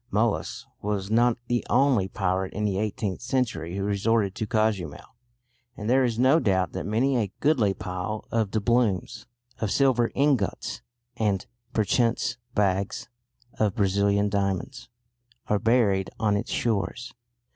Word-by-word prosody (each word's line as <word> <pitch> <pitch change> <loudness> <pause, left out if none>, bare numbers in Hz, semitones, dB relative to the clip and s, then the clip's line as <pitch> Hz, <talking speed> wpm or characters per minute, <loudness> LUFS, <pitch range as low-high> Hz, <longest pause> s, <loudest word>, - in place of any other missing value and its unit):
Molas 110 +1 -1 0.2
was 105 -1 -2
not 120 +1 +3
the 120 -1 0
only 125 -6 +3
pirate 95 -1 -1
in 105 +1 -2
the 100 -2 0
eighteenth 105 -2 -2
century 105 -10 -1
who 100 - -2
resorted 100 0 +1
to 110 - -4
Cozumel, 110 - -1 0.6
and 105 - -5
there 130 +3 +4
is 120 -3 0
no 130 +6 +5
doubt 95 - +1
that 85 - -5
many 125 +5 +2
a 105 -5 -1
goodly 120 -10 +2
pile 90 +4 -4
of 110 -3 +1
doubloons, 110 -2 0 0.3
of 110 - -1
silver 125 -1 +3
ingots, 135 -8 0 0.4
and 105 -4 0 0.3
perchance 115 +2 +1 0.2
bags 100 +4 0 0.5
of 105 -1 +1
Brazilian 100 0 +2
diamonds, 100 +5 -2 0.6
are 105 - +1
buried 105 -5 +2
on 105 -2 +2
its 100 - -2
shores. 115 +2 -2
105 Hz, 135 wpm, -26 LUFS, 100-120 Hz, 0.6 s, no